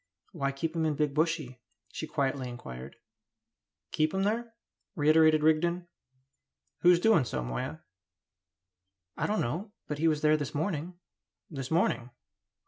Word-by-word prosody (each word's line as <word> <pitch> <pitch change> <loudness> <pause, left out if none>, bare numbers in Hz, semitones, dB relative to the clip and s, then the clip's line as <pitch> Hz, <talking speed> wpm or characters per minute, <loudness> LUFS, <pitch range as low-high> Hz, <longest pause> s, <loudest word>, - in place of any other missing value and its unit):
"Why 140 0 -1
keep 160 +4 -3
him 165 - 0
in 150 - 0
Big 150 -1 0
Bushy?" 155 -5 -1 0.3
she 155 - -4
quietly 135 -3 -1
inquired. 65 - -8 1.0
"Keep 155 +3 +1
him 190 - +1
there?" 230 +3 -1 0.4
reiterated 155 0 +5
Rigden. 170 +3 +2 0.9
"Who's 175 0 +6
doing 215 -6 +4
so, 120 - -3
Moya?" - - -4 1.3
"I - - -1
don't 215 - 0
know; 180 - -3
but 150 -1 -4
he 165 - +3
was 155 -2 +2
there 155 0 +4
this 145 -3 -5
morning." 165 +2 -2 0.6
"This 135 -4 -5
morning?" 160 -7 +1
155 Hz, 135 wpm, -30 LUFS, 140-170 Hz, 1.3 s, Who's